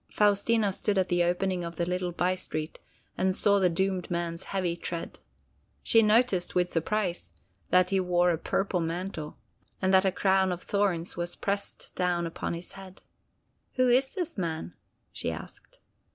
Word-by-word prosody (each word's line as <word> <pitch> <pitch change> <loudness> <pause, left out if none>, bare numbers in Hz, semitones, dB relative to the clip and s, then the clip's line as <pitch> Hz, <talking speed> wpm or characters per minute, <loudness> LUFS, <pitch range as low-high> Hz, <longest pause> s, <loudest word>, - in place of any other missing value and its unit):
Faustina 205 0 +2
stood 200 +1 -1
at 185 -1 +2
the 175 0 +3
opening 180 +1 0
of 170 0 -6
the 170 - -1
little 180 0 -2
bystreet 175 -3 -2 0.4
and 185 0 +2
saw 200 0 +4
the 185 -2 +4
doomed 185 +1 -1
man's 170 0 -3
heavy 185 -3 -1
tread. 170 -1 -6 0.6
She 225 - +5
noticed, 215 -4 +3
with 180 0 +2
surprise, 180 +2 -1 0.4
that 185 0 +4
he 195 - +3
wore 180 -1 +3
a 165 - -1
purple 195 0 0
mantle, 165 -2 -4 0.4
and 190 0 +1
that 190 0 +6
a 190 - +2
crown 190 0 +2
of 180 0 -4
thorns 190 -5 0
was 175 0 -3
pressed 200 0 -3
down 175 -1 0
upon 165 0 -3
his 170 +1 -9
head. 190 -1 -12 0.7
"Who 255 -1 +3
is 265 +5 +3
this 350 - -3
man?" 160 - -3 0.4
she - - -3
asked. - - -10
185 Hz, 165 wpm, -28 LUFS, 175-195 Hz, 0.7 s, that